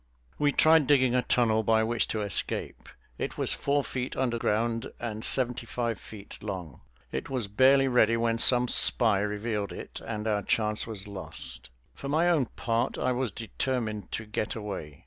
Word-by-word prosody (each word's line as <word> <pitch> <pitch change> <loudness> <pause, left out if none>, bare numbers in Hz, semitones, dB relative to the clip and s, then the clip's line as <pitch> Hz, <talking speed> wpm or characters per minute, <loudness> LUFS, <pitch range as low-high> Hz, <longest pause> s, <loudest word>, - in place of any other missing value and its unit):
We 145 -1 +3
tried 155 -1 +5
digging 130 -3 +4
a 125 - +3
tunnel 115 -3 +2
by 110 0 +2
which 115 +1 0
to 110 - -2
escape. 100 -3 -2 0.3
It - - -4
was - - +2
four 140 0 0
feet 130 0 -4
under 120 -3 -1
ground 115 +1 -1
and 110 -2 -5
seventy 125 -2 0
five 115 -1 -2
feet 105 -2 -10
long. 95 -8 -6 0.3
It - - -4
was 125 -6 -2
barely 135 +6 +4
ready 115 -3 +3
when 115 0 0
some 125 0 +5
spy 100 - +5
revealed 105 0 -2
it, - - -8
and 110 -1 -5
our 105 -2 +1
chance 105 +1 0
was 105 -4 -4
lost. 65 -11 -8 0.2
For 140 - -7
my 160 +4 +2
own 150 -8 +2
part, 115 +2 -2
I 130 - 0
was 125 -1 -1
determined 110 0 -4
to 110 - -3
get 105 0 -3
away. 95 -9 -6
115 Hz, 175 wpm, -28 LUFS, 105-125 Hz, 0.3 s, tried